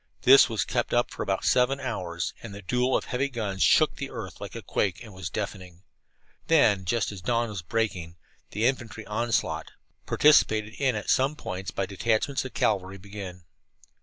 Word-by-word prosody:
This 135 Hz, 0 st, +8 dB
was 110 Hz, -3 st, -1 dB
kept -, -, -1 dB
up -, -, +2 dB
for -, -, -7 dB
about -, -, -1 dB
seven 130 Hz, +2 st, +3 dB
hours, 85 Hz, -10 st, -3 dB
and 110 Hz, -3 st, -8 dB
the 100 Hz, -, -10 dB
duel 125 Hz, +6 st, +1 dB
of -, -, -5 dB
heavy 135 Hz, +3 st, -1 dB
guns 105 Hz, -7 st, -4 dB
shook -, -, +4 dB
the -, -, -5 dB
earth -, -, -8 dB
like -, -, -7 dB
a -, -, -6 dB
quake 95 Hz, -4 st, -1 dB
and 110 Hz, -3 st, -12 dB
was 95 Hz, -2 st, -6 dB
deafening. 90 Hz, +2 st, -6 dB, 0.6 s
Then, 105 Hz, -12 st, +4 dB
just 110 Hz, +3 st, 0 dB
as 100 Hz, -3 st, -8 dB
dawn 115 Hz, +4 st, 0 dB
was 100 Hz, -4 st, -5 dB
breaking, 90 Hz, -3 st, -2 dB, 0.3 s
the 110 Hz, +3 st, -1 dB
infantry 115 Hz, -4 st, -2 dB
onslaught, 115 Hz, +2 st, -1 dB, 0.4 s
participated 110 Hz, -8 st, +4 dB
in 130 Hz, -4 st, +2 dB
at 105 Hz, -, -1 dB
some 135 Hz, +3 st, +2 dB
points 95 Hz, -7 st, -5 dB
by 95 Hz, -, -2 dB
detachments 115 Hz, +7 st, 0 dB
of 130 Hz, -, -8 dB
cavalry, 95 Hz, -2 st, 0 dB
began. 95 Hz, -2 st, -9 dB
105 Hz, 180 wpm, -27 LUFS, 95-125 Hz, 0.6 s, This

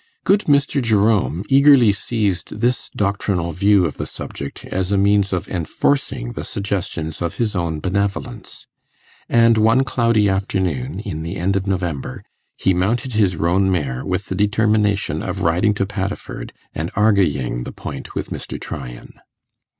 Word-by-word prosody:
Good 205 Hz, +2 st, +3 dB
Mr. 140 Hz, -1 st, +2 dB
Jerome 105 Hz, -5 st, +2 dB
eagerly 135 Hz, -5 st, +6 dB
seized 100 Hz, -2 st, -2 dB
this 120 Hz, +2 st, 0 dB
doctrinal 100 Hz, -4 st, 0 dB
view 100 Hz, +2 st, +3 dB
of 75 Hz, -, -4 dB
the -, -, -4 dB
subject 70 Hz, 0 st, -7 dB
as 95 Hz, +1 st, -2 dB
a 100 Hz, -, +3 dB
means 100 Hz, 0 st, +3 dB
of 90 Hz, -2 st, -2 dB
enforcing 85 Hz, -, -1 dB
the -, -, -5 dB
suggestions 90 Hz, -6 st, -3 dB
of 85 Hz, -1 st, -2 dB
his 110 Hz, -3 st, -1 dB
own 85 Hz, -3 st, -1 dB
benevolence; 100 Hz, +5 st, -3 dB, 0.6 s
and 115 Hz, -1 st, +5 dB
one 115 Hz, +4 st, +4 dB
cloudy 115 Hz, -5 st, +2 dB
afternoon, 95 Hz, -5 st, -1 dB
in 95 Hz, -8 st, -5 dB
the 85 Hz, +3 st, -4 dB
end 95 Hz, +2 st, 0 dB
of 100 Hz, 0 st, -1 dB
November, 85 Hz, -9 st, -3 dB, 0.3 s
he 95 Hz, -, +2 dB
mounted 110 Hz, +8 st, 0 dB
his 100 Hz, -5 st, +2 dB
roan 95 Hz, +4 st, +2 dB
mare 70 Hz, -8 st, -1 dB
with 95 Hz, +1 st, -2 dB
the -, -, -4 dB
determination 105 Hz, 0 st, +1 dB
of -, -, -4 dB
riding 90 Hz, +6 st, +2 dB
to 100 Hz, -, 0 dB
Paddiford 100 Hz, 0 st, -5 dB, 0.2 s
and 80 Hz, +3 st, -3 dB
'arguying' 85 Hz, -, +2 dB
the -, -, -6 dB
point -, -, -8 dB
with -, -, -4 dB
Mr. -, -, -6 dB
Tryan. 60 Hz, -4 st, -8 dB
100 Hz, 150 wpm, -20 LUFS, 85-110 Hz, 0.6 s, eagerly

